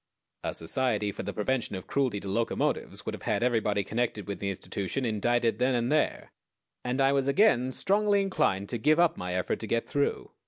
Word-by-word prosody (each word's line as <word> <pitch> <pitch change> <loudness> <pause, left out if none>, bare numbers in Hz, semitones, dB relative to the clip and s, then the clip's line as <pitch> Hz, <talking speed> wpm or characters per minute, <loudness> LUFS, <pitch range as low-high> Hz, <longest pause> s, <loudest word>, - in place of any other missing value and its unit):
A - - -2
Society 105 +3 0
for - - -6
the 100 - -4
Prevention 115 +1 -1
of 95 - -6
Cruelty 130 -7 0
to - - -7
Locomotives 115 +4 -1
would - - -3
have - - -7
had 105 +2 0
everybody 110 -4 +1
connected 110 0 -2
with 100 - -4
the 100 - -2
institution 100 +6 -3
indicted 115 +1 +1
then 125 +1 +2
and 120 +2 0
there, 155 0 0 0.5
and 125 +2 -2
I 135 0 +4
was 140 -1 +1
again 140 - +3
strongly 205 +6 +2
inclined 100 - 0
to 120 - -3
give 155 +7 +3
up 170 -1 +4
my 90 0 -4
effort 90 - -1
to 110 - -5
get 115 +1 0
through. 145 -2 -1
120 Hz, 200 wpm, -28 LUFS, 100-135 Hz, 0.5 s, I